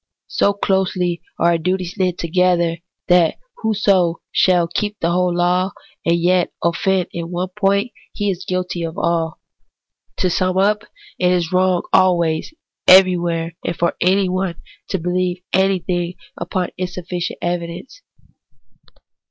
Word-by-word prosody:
So 200 Hz, -, +2 dB
closely 185 Hz, -3 st, 0 dB, 0.2 s
are 170 Hz, -, +3 dB
our 170 Hz, -, +2 dB
duties 180 Hz, +1 st, -1 dB
knit 180 Hz, -2 st, 0 dB
together, 170 Hz, -1 st, +1 dB, 0.3 s
that 175 Hz, -2 st, +4 dB, 0.2 s
whoso 195 Hz, -6 st, +2 dB, 0.2 s
shall 180 Hz, -2 st, +3 dB
keep 205 Hz, +4 st, -3 dB
the 170 Hz, -, 0 dB
whole 180 Hz, 0 st, +2 dB
law, 180 Hz, +2 st, +1 dB, 0.3 s
and 170 Hz, -, +2 dB
yet 180 Hz, +1 st, +2 dB
offend 180 Hz, +2 st, +1 dB
in 170 Hz, -1 st, -5 dB
one 180 Hz, +1 st, -3 dB
point, 200 Hz, +3 st, +1 dB, 0.2 s
he 205 Hz, -2 st, -1 dB
is 185 Hz, 0 st, -5 dB
guilty 180 Hz, -2 st, -3 dB
of 165 Hz, 0 st, -4 dB
all. 165 Hz, -1 st, -1 dB, 0.8 s
To -, -, +1 dB
sum 185 Hz, +1 st, 0 dB
up: 210 Hz, +2 st, +2 dB, 0.3 s
it 180 Hz, 0 st, +3 dB
is 175 Hz, -2 st, 0 dB
wrong 185 Hz, -1 st, +2 dB
always, 170 Hz, -, +3 dB, 0.4 s
everywhere, 175 Hz, -3 st, +5 dB
and 170 Hz, -, -3 dB
for 170 Hz, -, 0 dB
anyone, 185 Hz, -1 st, +1 dB, 0.3 s
to 195 Hz, -, -1 dB
believe 180 Hz, +1 st, -1 dB
anything 180 Hz, -2 st, +1 dB, 0.2 s
upon 180 Hz, +1 st, -2 dB
insufficient 180 Hz, -1 st, -4 dB
evi 175 Hz, -1 st, -1 dB
dence. 180 Hz, -, -10 dB
180 Hz, 135 wpm, -19 LUFS, 170-185 Hz, 0.8 s, everywhere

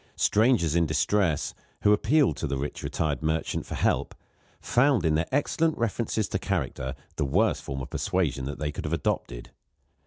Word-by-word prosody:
Strangers 105 Hz, -, +3 dB
in 85 Hz, -1 st, +3 dB
distress, 80 Hz, +2 st, +1 dB, 0.3 s
who 105 Hz, -, +6 dB
appealed 130 Hz, +7 st, +3 dB
to 80 Hz, -, -2 dB
the 70 Hz, -1 st, -2 dB
rich 70 Hz, +2 st, -4 dB
retired 75 Hz, -4 st, -2 dB
merchant 80 Hz, +1 st, -1 dB
for -, -, -5 dB
help, -, -, 0 dB, 0.4 s
found 125 Hz, -, +2 dB
in 80 Hz, -, +3 dB
their 80 Hz, +2 st, +1 dB
excellent 155 Hz, +3 st, +1 dB
references 110 Hz, -2 st, -1 dB
to -, -, -1 dB
character 65 Hz, +1 st, -2 dB, 0.2 s
the 75 Hz, -, +1 dB
worst 65 Hz, -, +2 dB
form 70 Hz, 0 st, -5 dB
of -, -, -10 dB
persuasion 70 Hz, -8 st, -1 dB
that 70 Hz, -, -4 dB
they 75 Hz, -1 st, -2 dB
could -, -, -6 dB
have 75 Hz, -, -2 dB
adopted. -, -, -3 dB
80 Hz, 175 wpm, -27 LUFS, 75-110 Hz, 0.4 s, who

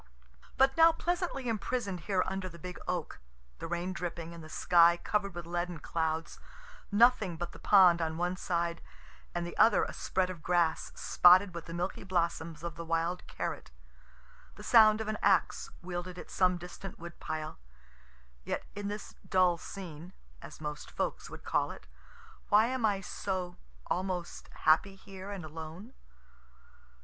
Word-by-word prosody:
But 270 Hz, +1 st, +4 dB
now 330 Hz, 0 st, +7 dB
pleasantly 345 Hz, -5 st, -2 dB
imprison'd 220 Hz, -3 st, -2 dB
here 185 Hz, +3 st, 0 dB
under 190 Hz, -1 st, -3 dB
the 170 Hz, -, -12 dB
big 180 Hz, +2 st, -8 dB
oak 175 Hz, -, -3 dB, 0.4 s
the -, -, -5 dB
rain 175 Hz, +2 st, -2 dB
dripping, 170 Hz, -2 st, -5 dB
and 170 Hz, -1 st, -10 dB
the 155 Hz, -, -11 dB
sky 170 Hz, +1 st, +5 dB
cover'd 200 Hz, 0 st, -1 dB
with 175 Hz, -1 st, -6 dB
leaden 175 Hz, 0 st, -3 dB
clouds 160 Hz, 0 st, -2 dB, 0.5 s
nothing 205 Hz, -5 st, +4 dB
but 175 Hz, +1 st, -4 dB
the -, -, -13 dB
pond 180 Hz, -4 st, +6 dB
on 160 Hz, -1 st, -2 dB
one 175 Hz, +1 st, 0 dB
side, 170 Hz, -2 st, -2 dB, 0.5 s
and 175 Hz, 0 st, -1 dB
the 175 Hz, -, -7 dB
other 225 Hz, -2 st, +6 dB
a -, -, -4 dB
spread 185 Hz, -1 st, -1 dB
of 175 Hz, -4 st, -9 dB
grass, 170 Hz, -1 st, +1 dB
spotted 180 Hz, +2 st, +6 dB
with 170 Hz, -2 st, -6 dB
the 165 Hz, -, -8 dB
milky 180 Hz, +2 st, -3 dB
blossoms 170 Hz, -3 st, -1 dB
of 170 Hz, -2 st, -5 dB
the 170 Hz, -, -5 dB
wild 165 Hz, +2 st, -1 dB
carrot -, -, -4 dB, 0.9 s
the -, -, -11 dB
sound 215 Hz, -2 st, +6 dB
of 220 Hz, -, -4 dB
an 215 Hz, 0 st, -2 dB
axe 195 Hz, -2 st, +2 dB
wielded 180 Hz, 0 st, -5 dB
at -, -, -9 dB
some 180 Hz, -1 st, +3 dB
distant 180 Hz, +2 st, -9 dB
wood 170 Hz, 0 st, -10 dB
pile 155 Hz, -, -5 dB, 0.8 s
yet -, -, -3 dB
in 205 Hz, 0 st, -4 dB
this 205 Hz, +1 st, -6 dB, 0.2 s
dull 185 Hz, -2 st, +4 dB
scene, 175 Hz, -2 st, -9 dB, 0.3 s
(as -, -, -11 dB
most 150 Hz, -1 st, -6 dB
folks -, -, -3 dB
would -, -, -10 dB
call -, -, +1 dB
it,) -, -, -10 dB, 0.6 s
why 210 Hz, +2 st, +6 dB
am 250 Hz, -2 st, +1 dB
I 200 Hz, -2 st, 0 dB
so 185 Hz, -1 st, -4 dB, 0.3 s
(almost) 180 Hz, -1 st, -3 dB
happy 180 Hz, +5 st, +4 dB
here 195 Hz, 0 st, -10 dB
and 195 Hz, -5 st, -6 dB
alone? 160 Hz, -, -9 dB
180 Hz, 160 wpm, -31 LUFS, 170-200 Hz, 0.9 s, now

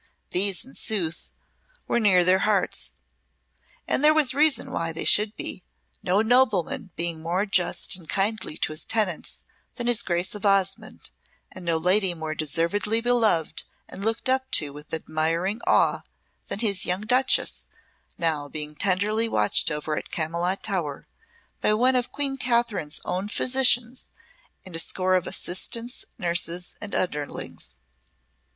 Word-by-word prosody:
These, 195 Hz, +2 st, +3 dB
in 265 Hz, -, -16 dB
sooth, 180 Hz, -7 st, -1 dB, 0.6 s
were 240 Hz, -, +1 dB
near 190 Hz, -5 st, +4 dB
their 185 Hz, +1 st, +4 dB
hearts; 205 Hz, -2 st, 0 dB, 0.9 s
and -, -, 0 dB
there 305 Hz, +1 st, +6 dB
was 300 Hz, -5 st, +4 dB
reason 295 Hz, +1 st, +2 dB, 0.2 s
they -, -, -1 dB
should 210 Hz, +1 st, +4 dB
be, -, -, -4 dB, 0.4 s
no 195 Hz, +4 st, +1 dB
nobleman 240 Hz, -1 st, +1 dB
being 170 Hz, -1 st, -1 dB
more 175 Hz, +5 st, -1 dB
just 185 Hz, -1 st, +2 dB
and 175 Hz, -4 st, -9 dB
kindly 200 Hz, -4 st, -1 dB
to -, -, 0 dB
his 155 Hz, -, -4 dB
tenants 205 Hz, -7 st, -1 dB, 0.3 s
than 240 Hz, -, -4 dB
his 240 Hz, -2 st, +6 dB
Grace 175 Hz, +1 st, -1 dB
of 210 Hz, -, -7 dB
Osmonde, 195 Hz, -1 st, 0 dB, 0.4 s
and 185 Hz, -, -10 dB
no 170 Hz, -1 st, +1 dB
lady 180 Hz, +2 st, +3 dB
more 160 Hz, -1 st, -4 dB
deservedly 170 Hz, +8 st, 0 dB
beloved 225 Hz, -10 st, +1 dB, 0.2 s
and 195 Hz, -, -8 dB
looked 225 Hz, +3 st, -1 dB
up 260 Hz, 0 st, +1 dB
to 145 Hz, -3 st, +1 dB
with 150 Hz, +1 st, -12 dB
admiring 165 Hz, +6 st, -2 dB
awe -, -, +3 dB, 0.5 s
than 205 Hz, -, -2 dB
his 200 Hz, -5 st, +3 dB
young 180 Hz, +2 st, 0 dB
Duchess, 255 Hz, +4 st, +2 dB, 0.5 s
now 155 Hz, -4 st, -1 dB
being 150 Hz, 0 st, -4 dB
tenderly 205 Hz, +6 st, +1 dB
watched 105 Hz, -, +2 dB
over 150 Hz, +1 st, -3 dB
at -, -, -5 dB
Camylott 170 Hz, +4 st, -2 dB
Tower 170 Hz, -9 st, -3 dB, 0.5 s
by 215 Hz, -, +2 dB
one 255 Hz, +4 st, +3 dB
of 250 Hz, 0 st, -1 dB
Queen 275 Hz, -1 st, -2 dB
Catherine's 235 Hz, -, 0 dB
own 185 Hz, +3 st, -2 dB
physicians 250 Hz, 0 st, +2 dB, 0.6 s
and 185 Hz, -3 st, -6 dB
a -, -, +2 dB
score 185 Hz, +2 st, +1 dB
of 185 Hz, -1 st, +1 dB
assistants, 230 Hz, +7 st, -3 dB
nurses, 175 Hz, -2 st, -1 dB
and 205 Hz, -, -5 dB
underlings. 150 Hz, -5 st, -4 dB
195 Hz, 145 wpm, -24 LUFS, 170-230 Hz, 0.9 s, there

